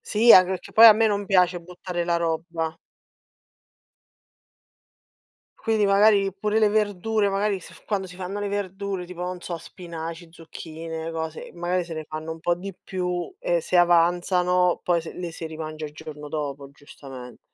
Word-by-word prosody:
Sì, 225 +3 +5
anche 185 0 +8
perché 185 -2 -5
poi 225 +1 +9
a 220 - +11
me 220 +1 +2
non 205 -1 0
piace 180 -2 +3
buttare 175 0 -5
la 170 -1 +1
roba. 165 -1 -2 2.8
Quindi 220 -2 +1
magari 200 0 +4
pure 210 +2 0
le 215 -1 +4
verdure, 210 0 +1
magari 200 0 0
s 180 - -15
quando 195 -3 -1
si 180 0 -12
fanno 190 +2 -5
le 205 0 -2
verdure, 195 -2 -4
tipo 180 0 -7
non 180 0 -4
so 170 -1 -5
spinaci, 165 0 -8
zucchine, 165 -1 -7
cose 160 -1 -5
magari 175 +1 -1
se 170 - -7
ne 155 -1 -5
fanno 155 +1 -5
un 160 - -11
po' 175 +1 +1
di 190 +1 -8
più, 180 - -3
e - - 0
se 180 - +1
avanzano 175 +1 +3
poi 175 -1 +1
s 160 - -8
le 175 -1 -5
si 165 - -6
rimangia 155 -1 -6
il 150 - -11
giorno 150 -1 -9
dopo 140 -2 -4
giustament 135 -3 -12
180 Hz, 170 wpm, -24 LUFS, 165-195 Hz, 2.8 s, a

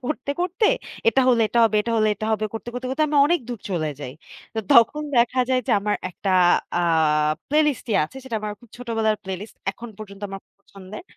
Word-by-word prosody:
করতে, 285 +1 -3
করতে 370 +4 +1 0.4
এটা 265 +4 +3
হলে 235 -2 +4
এটা 235 - 0
হবে 215 -1 +2
এটা 230 - -3
হলে 215 -1 +3
এটা 215 - -5
হবে, 215 0 0
করতে, 225 +1 -7
করতে, 250 +1 -5
করতে 290 +4 0
আমি 295 - 0
অনেক 345 +2 +2
দূর 235 -4 -5
চলে 160 -4 -1
যাই। 130 -3 -6 0.4
তো - - -3
তখন 235 +6 +5
দেখা 240 +2 +3
যায় 255 -1 +2
যে - - +3
আমার 205 +1 0
একটা 195 +2 -4 0.5
আ - - +2 0.7
প্লেলিস্ট 300 -2 +2
ই - - +1
আছে। 165 - -12
সেটা 235 -4 -3
আমার 210 0 -4
খুব 240 -2 -19
ছোটবেলার 225 -3 0
প্লেলিস্ট। 190 +3 -7
এখন 235 +3 -10
পর্যন্ত 200 -1 -10
আমার 195 0 -7 0.2
পছন্দের। 200 - -11
230 Hz, 205 wpm, -23 LUFS, 205-260 Hz, 0.7 s, তখন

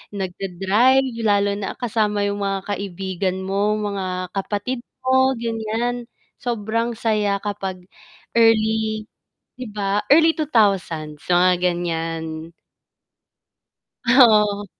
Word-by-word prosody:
nag-da-drive 195 +7 +1 0.2
lalo 205 -2 +2
na 195 - -4
kasama 210 -3 0
yung 205 0 -1
mga 195 -1 -2
kaibigan 190 -1 -3
mo, 200 +2 0
mga 190 -4 -3
kapatid 205 +6 -3 0.2
mo 260 0 +3
ganyan, 230 +1 -3 0.3
sobrang 230 0 -2
saya 210 -3 0
kapag 195 -3 -4 0.6
early, 220 -1 +2 0.5
'di 255 -1 -7
ba? 205 0 -1
Early 325 +2 +6
2000s 195 - 0
mga 180 +1 +5 0.2
gan'yan. 165 -1 -4 1.5
Ah, 250 +2 +7 0.2
oo. 205 0 -3
205 Hz, 95 wpm, -21 LUFS, 190-225 Hz, 1.5 s, Ah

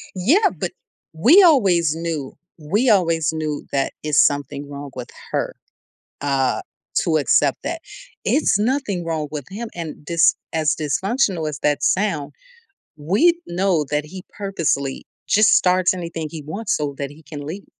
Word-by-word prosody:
Yeah, 330 - +3
but - - -3 0.4
we 255 - +6
always 185 - +4
knew 165 -5 -4 0.2
we 205 - +1
always 165 -6 +2
knew 155 -2 -3
that 135 -1 0
it's 150 -1 +4
something 145 0 -2
wrong 140 -1 -8
with 125 -1 -7 0.2
her, - - -2 0.7
uh, 135 -2 +1 0.4
to 160 -1 +2
accept 140 -1 +2
that; 330 +1 -4 0.4
it's 255 -8 +2
nothing 215 -6 0
wrong 160 -2 -2
with 145 -4 -5
him 225 +3 -5
and 165 -3 -5
dys 170 +1 +4 0.2
as 155 -1 +1
dysfunctional 175 - 0
as 145 - -6
that 145 -1 0
sound, 190 -8 0 0.7
we 200 - +3
know 175 -4 +1
that 150 0 0
he 185 +4 -9
purposely 165 -9 -1 0.2
just 215 0 +5
starts 185 0 +3
anything 165 -3 -5
he 160 -2 -7
wants 200 +8 -2
so 145 -2 -3
that 140 -1 -3
he 155 +2 -16
can 145 -2 -8
leave. 185 +6 -7
165 Hz, 150 wpm, -21 LUFS, 150-195 Hz, 0.7 s, we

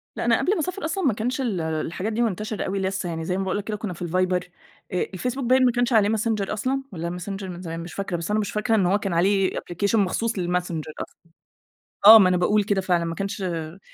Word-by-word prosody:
لأ، - - -3
أنا - - +4
قبل 390 - +2
ما - - -2
أسافر 365 +3 -3
أصلًا 375 +4 -2
ما 265 - +3
كانش 245 +6 -2
ال 215 -9 -1
الحاجات 160 +6 -3
دي 235 - 0
منتشرة 215 -1 -2
أوي 195 +1 -2
لسه 190 -1 -2
يعني، 165 -1 -4
زي 180 +2 -1
ما 195 - -1
باقول 190 +1 -1
لك 205 - -3
كده 215 0 -4
كنا 210 -3 -4
في 170 - -14
الViber. 180 +1 +1 0.7
الFacebook 250 +8 -3
باين 255 +2 +4
ما 245 - +4
كانش 245 +1 0
عليه 210 -2 +4
Messenger 220 -2 0
أصلًا 260 +6 -1
والَّا 170 0 -4
Messenger 195 +2 -5
من 180 -2 -7
زمان 165 -2 -5
مش 170 +1 -8
فاكرة. 195 -3 -3
بس 170 +4 -4
أنا 215 - +2
مش 210 - -2
فاكرة 220 +2 +1
إن 195 -4 +3
هو 190 +3 +3
كان 195 -3 -3
عليه 190 +2 +3
application 200 +5 -1
مخصوص 220 +2 +1
للMessenger 175 -3 -2
أصلًا. - - -15 0.9
آه، 220 +2 +12
ما 185 -3 +5
أنا 180 - +2
باقول 205 +4 +2
كده 200 -1 0
فعلًا 175 -2 +1
ما 165 0 -3
كانش 195 +2 -4
ما 170 -1 -4
195 Hz, 245 wpm, -24 LUFS, 180-220 Hz, 0.9 s, آه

